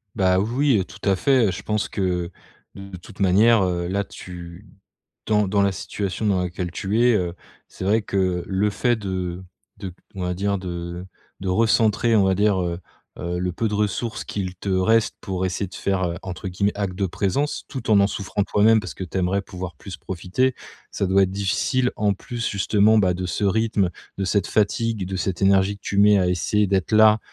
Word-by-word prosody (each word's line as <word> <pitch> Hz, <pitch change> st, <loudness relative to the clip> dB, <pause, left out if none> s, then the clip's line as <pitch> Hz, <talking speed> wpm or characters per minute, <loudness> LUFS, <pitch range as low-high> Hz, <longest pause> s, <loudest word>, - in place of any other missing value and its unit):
Bah, 95 Hz, -3 st, +3 dB
oui 125 Hz, +5 st, +2 dB
oui, 95 Hz, -, -1 dB
tout 105 Hz, +1 st, -9 dB
à 95 Hz, -, +4 dB
fait. 115 Hz, +1 st, +3 dB
Je 90 Hz, -, -6 dB
pense 105 Hz, -1 st, -1 dB
que, 90 Hz, -3 st, -2 dB, 0.4 s
de 100 Hz, -1 st, -9 dB
toute 90 Hz, -, -15 dB
manière, 105 Hz, +3 st, +5 dB
heu, 85 Hz, -1 st, -1 dB
là, 100 Hz, +2 st, -1 dB
tu 90 Hz, 0 st, -10 dB, 0.6 s
dans 105 Hz, -2 st, +2 dB
dans 100 Hz, +1 st, +2 dB
la 100 Hz, -, +2 dB
situation 100 Hz, +2 st, -4 dB
dans 95 Hz, -3 st, +2 dB
laquelle 90 Hz, 0 st, -4 dB
tu 100 Hz, +4 st, -1 dB
es, 120 Hz, -1 st, +5 dB
heu, 90 Hz, -4 st, -1 dB, 0.3 s
c'est -, -, -8 dB
vrai 105 Hz, +3 st, +2 dB
que 95 Hz, -3 st, -1 dB
le 100 Hz, +2 st, +1 dB
fait 120 Hz, +4 st, +1 dB
de 95 Hz, -3 st, -4 dB, 0.4 s
de 95 Hz, -4 st, -6 dB, 0.2 s
on 95 Hz, -, -5 dB
va 90 Hz, 0 st, -1 dB
dire, 100 Hz, +2 st, -1 dB
de 85 Hz, -1 st, -6 dB, 0.4 s
de 95 Hz, -, -4 dB
recentrer, 110 Hz, +3 st, +3 dB
on 105 Hz, -, +5 dB
va 95 Hz, -, +3 dB
dire, 100 Hz, -1 st, +2 dB
heu 85 Hz, -1 st, -2 dB, 0.4 s
heu, 85 Hz, 0 st, -3 dB
le 90 Hz, 0 st, -1 dB
peu 110 Hz, +5 st, -1 dB
de 105 Hz, -, -3 dB
ressources 105 Hz, +2 st, -2 dB
qu'il 95 Hz, -3 st, -4 dB
te 100 Hz, -, -7 dB
reste 105 Hz, +4 st, +2 dB
pour 95 Hz, -3 st, -3 dB
essayer 95 Hz, +2 st, -2 dB
de 90 Hz, -, -13 dB
faire, 95 Hz, -1 st, -1 dB
heu, 85 Hz, -1 st, -1 dB
entre 95 Hz, +1 st, -6 dB
guillemets, 100 Hz, +3 st, 0 dB
«acte 100 Hz, -3 st, -2 dB
de 100 Hz, +2 st, -1 dB
présence» 100 Hz, -, -1 dB
tout 125 Hz, -4 st, -5 dB
en 105 Hz, -2 st, +6 dB
en 100 Hz, -, +5 dB
souffrant 100 Hz, 0 st, -2 dB
toi-même 110 Hz, +2 st, +4 dB
parce -, -, -7 dB
que 95 Hz, -, -5 dB
tu 90 Hz, +2 st, -4 dB
aimerais 95 Hz, +2 st, 0 dB
pouvoir 90 Hz, -2 st, -7 dB
plus 95 Hz, -, -9 dB
profiter, 95 Hz, +9 st, -1 dB, 0.4 s
ça 100 Hz, -, -1 dB
doit 95 Hz, +1 st, +4 dB
être 95 Hz, -, -3 dB
difficile. 100 Hz, +6 st, 0 dB
En 105 Hz, -1 st, +1 dB
plus, 115 Hz, +3 st, -4 dB
justement, 105 Hz, +2 st, +3 dB
bah, 95 Hz, -4 st, +3 dB
de 90 Hz, +1 st, -4 dB
ce 95 Hz, -, -2 dB
rythme, 100 Hz, -2 st, +1 dB, 0.3 s
de 100 Hz, -, -1 dB
cette 100 Hz, 0 st, +1 dB
fatigue, 110 Hz, 0 st, 0 dB
de 95 Hz, +1 st, -4 dB
cette 95 Hz, 0 st, -2 dB
énergie 95 Hz, +1 st, +3 dB
que -, -, -27 dB
tu 100 Hz, -, -2 dB
mets 105 Hz, 0 st, +6 dB
à 90 Hz, -, +2 dB
essayer 105 Hz, +4 st, +1 dB
d'être 95 Hz, 0 st, 0 dB
là 110 Hz, 0 st, +6 dB
100 Hz, 210 wpm, -23 LUFS, 90-105 Hz, 0.6 s, en